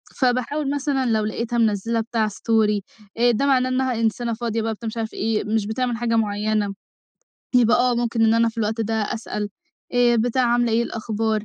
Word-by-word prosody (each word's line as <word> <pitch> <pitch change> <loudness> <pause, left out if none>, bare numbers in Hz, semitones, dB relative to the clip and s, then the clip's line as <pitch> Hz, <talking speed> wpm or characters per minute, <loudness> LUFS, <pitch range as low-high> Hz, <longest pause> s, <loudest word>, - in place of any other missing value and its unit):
فباحاول 260 +3 0
مثلًا 275 -2 0
لو 220 -2 +1
لقيتها 235 +2 -2
منزّلة 225 +1 +1
بتاع 225 -1 -1
story 210 0 +1 0.4
آآ، 240 +1 +4
ده 255 +5 0
معناه 255 -2 +3
إنّها 260 0 0
إنسانة 230 +1 0
فاضية 230 0 -2
بقى، 225 0 -1
بتاع، 225 +2 -7
مش 220 - -5
عارف 225 -1 -3
إيه، 220 0 -1
مش 215 -1 0
بتعمل 240 +1 -1
حاجة 230 -1 0
معيّنة، 210 -1 0 0.8
يبقى 240 -2 +5
آه 250 -1 +2
ممكن 235 -1 +1
إن 225 0 +4
أنا 230 0 +3
في 230 - -8
الوقت 220 +1 -1
ده 225 0 -1
أسأل. 210 -1 -3 0.5
آآ 240 -1 +4
بتاع 245 +3 +1
عاملة 240 -1 +2
إيه، 225 - +3
إيه - - +3
الأخبار، 220 -1 -2
230 Hz, 195 wpm, -22 LUFS, 220-240 Hz, 0.8 s, يبقى